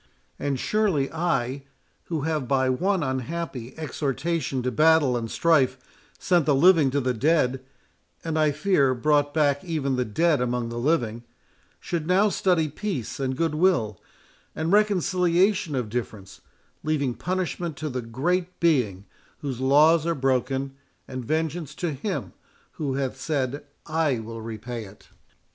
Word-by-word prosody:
And 140 -2 -1
surely 190 - +1
I, 140 -6 -1 0.4
who 160 -4 -3
have 155 -3 -1
by 130 -1 +2
one 185 +6 +1
unhappy 130 -1 -4
exhortation 150 -2 -2
to 125 - 0
battle 155 -1 +4
and 115 -2 -3
strife 135 -5 +2 0.4
sent 175 -5 +2
the 145 - +4
living 160 -1 +5
to 140 +2 0
the 130 -2 0
dead—and 135 +3 -2
I 155 -1 +3
fear 145 -4 +2
brought 145 +2 +2
back 145 -2 +1
even 150 -7 -1
the 125 - +2
dead 145 +6 +1
among 125 -1 -1
the 120 0 -4
living—should 125 +4 -3
now 195 +4 +4
study 180 -5 +1
peace 155 - -4
and 130 -1 -2
good 165 -1 0
will, 150 - +1 0.5
and 160 +2 -1
reconciliation 185 -4 +2
of 125 -4 -1
difference, 105 -4 -6 0.4
leaving 145 -5 0
punishment 175 -1 -3
to 155 - -4
the 125 -3 -3
Great 175 +11 -2
Being 120 - +1 0.4
whose 135 -4 -4
laws 150 +5 +4
are 170 - +1
broken, 135 0 0 0.3
and 130 -1 -5
vengeance 160 +2 -2
to 170 -4 -2
Him 185 +8 -4 0.4
who 140 -5 -3
hath 135 -2 -3
said, 145 -2 -2 0.2
I 155 -4 +1
will 115 0 -7
repay 115 +1 -6
it." 100 +1 -16
145 Hz, 140 wpm, -25 LUFS, 125-165 Hz, 0.5 s, living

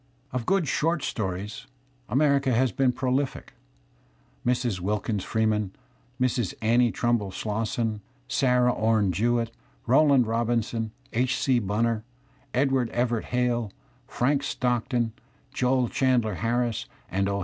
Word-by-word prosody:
Of 125 -2 -3
good 190 -5 +2
short 165 +1 +1
stories 100 0 -4 0.4
America 140 +2 +3
has 125 +1 +2
been 130 +5 +2
prolific. 130 +2 -2 0.9
Mrs. 120 -5 0
Wilkins 105 +1 -1
Freeman, 110 -3 0 0.4
Mrs. 125 -5 0
Annie 120 +2 +3
Trumbull 120 -5 0
Slosson, 110 +2 -2 0.3
Sarah 125 -1 +3
Ome 110 -3 +2
Jewett, 115 +5 +1 0.3
Rowland 135 0 +5
Robinson, 115 0 0 0.2
H. 125 +2 +1
C. 130 -3 +2
Bunner, 110 +2 0 0.5
Edward 130 -2 +1
Everett 120 -1 0
Hale, 120 -3 0 0.4
Frank 140 +3 +1
Stock 125 -4 -1
ton, 120 -3 0 0.4
Joel 125 -1 +2
Chandler 125 -4 +1
Harris, 115 +3 -1 0.2
and 100 +1 +1
"O. 100 0 -1
120 Hz, 115 wpm, -26 LUFS, 110-125 Hz, 0.9 s, Rowland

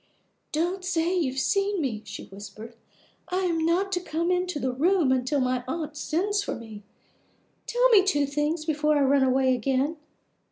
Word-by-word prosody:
"Don't 350 +5 -1
say 350 -1 0
you 330 -7 +1
have 265 - -3
seen 395 +6 +1
me," 245 -8 -2
she 210 -1 -8
whispered. 205 +3 -10 0.6
"I 370 +1 0
am 335 -3 0
not 360 +4 +1
to 360 - 0
come 340 0 -2
into 360 -2 0
the 260 -1 -1
room 275 -2 +2
till 285 +2 0
my 255 -1 0
aunt 310 +1 -4
sends 385 +8 0
for - - -4
me. 220 -3 -10 0.9
Tell - - +3
me 420 -5 +6
two 290 -7 +2
things 300 +3 -1
before 300 -1 +1
I - - +2
run 275 +1 +3
away 260 0 +3
again. 270 +5 0
305 Hz, 175 wpm, -26 LUFS, 260-360 Hz, 0.9 s, me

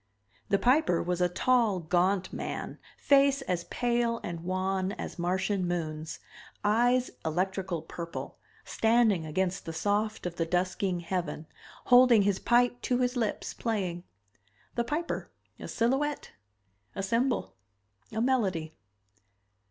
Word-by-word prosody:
The 200 - +4
Piper 245 - +3
was 180 +1 -1
a 180 - +3
tall, 230 +1 +2
gaunt 180 +3 +1
man, - - -5 0.2
face 275 -1 +4
as 175 -6 -2
pale 235 -1 0
and 170 -1 -4
wan 185 +1 -1
as - - -7
Martian 185 +2 0
moons, 160 -2 -3 0.5
eyes 245 +4 +3
electrical 180 +1 -1
purple, 170 -1 -7 0.3
standing 220 -7 +2
against 185 +4 -1
the 165 - -4
soft 210 +5 -1
of 175 -1 -4
the 165 - +1
dusking 180 +1 0
heaven, 170 -3 -3 0.4
holding 245 -4 +7
his 195 -1 +1
pipe 245 0 +2
to 250 - +1
his 250 0 0
lips, 225 -4 -2
playing. 185 -7 -2 0.7
The 235 - 0
Piper 305 +7 -3 0.3
a - - -7
silhouette 270 +5 0 0.6
a 195 - -3
symbol 235 +6 0 0.6
a 220 - -2
melody. 190 -11 0
195 Hz, 125 wpm, -29 LUFS, 175-240 Hz, 0.7 s, holding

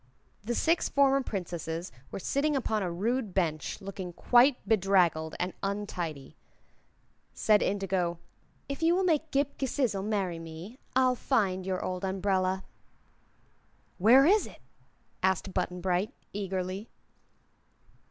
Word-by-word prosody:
The 240 +3 -2
six 330 +6 +2
former 275 -1 +4
Princesses 175 - -4 0.2
were - - -6
sitting 285 +9 0
upon 220 -5 0
a 180 -3 -2
rude 215 +3 -1
bench, 160 -5 -1
looking 190 -2 -6
quite 245 +7 +5
bedraggled 180 -6 +2
and 180 +1 -1
untidy. 180 -8 -4 1.0
Said 210 -1 +4
Indigo: 190 -3 0 0.5
"If 280 +3 -5
you 330 +2 +4
will 380 - +1
make 320 -3 +1
Ghip 280 0 -1
Ghisizzle 255 -7 0
marry 195 -5 -1
me, 165 +9 -9 0.2
I'll 255 -1 +4
find 195 -8 0
your 185 -1 -2
old 185 0 -3
umbrella." 190 0 0 1.4
"Where 245 +8 +7
is 410 +6 +4
it?" - - -13 0.6
asked 190 +1 0
Button 180 -1 -2
Bright, 185 +2 0 0.2
eagerly. 190 +1 -3
195 Hz, 125 wpm, -29 LUFS, 180-250 Hz, 1.4 s, Where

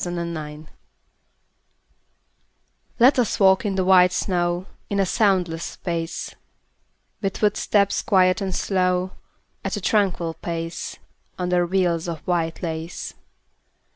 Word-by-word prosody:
VELVET 170 -1 -3
SHOES 150 -1 -7 2.3
Let 260 +3 +5
us 240 - +1
walk 190 +1 +5
in 195 - -1
the 190 -1 +1
white 180 -1 +6
snow 175 -1 0 0.2
In 200 - 0
a 195 - +3
soundless 180 -5 +1
space; 170 -2 -4 0.9
With 195 -2 -2
footsteps 205 -1 +2
quiet 185 -1 +3
and 190 -2 -2
slow, 185 -1 +1 0.5
At - - -2
a - - -5
tranquil 180 -5 +1
pace, 165 0 -5 0.4
Under 180 -1 +1
veils 175 -2 +1
of 165 -3 -4
white 165 -2 -1
lace. 160 0 -4
180 Hz, 115 wpm, -23 LUFS, 170-195 Hz, 2.3 s, white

